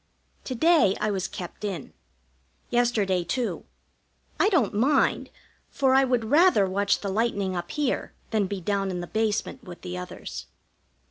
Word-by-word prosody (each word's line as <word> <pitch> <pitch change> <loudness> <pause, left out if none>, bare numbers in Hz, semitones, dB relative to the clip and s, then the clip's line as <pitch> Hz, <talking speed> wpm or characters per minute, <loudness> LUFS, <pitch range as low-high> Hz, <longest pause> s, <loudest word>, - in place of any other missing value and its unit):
To 255 - -3
day 305 - +4
I 215 - 0
was 190 -2 -1
kept 180 +3 -8
in. 190 -8 -4 0.8
Yesterday, 220 -7 +2
too. 240 +8 -2 0.7
I 405 - +4
don't 290 - +2
mind, 270 +7 +2 0.4
for 265 -2 +2
I 270 0 +5
would 245 -3 0
rather 315 - +5
watch 200 +2 +1
the 200 - -3
lightning 200 -2 0
up 175 0 -4
here 295 -4 -1 0.2
than 215 -3 +1
be 195 -1 -4
down 195 +1 0
in 180 -1 -3
the - - -4
basement 220 +5 -1
with 180 -5 -10
the 180 0 -5
others. 180 - -7
210 Hz, 155 wpm, -26 LUFS, 190-255 Hz, 0.8 s, I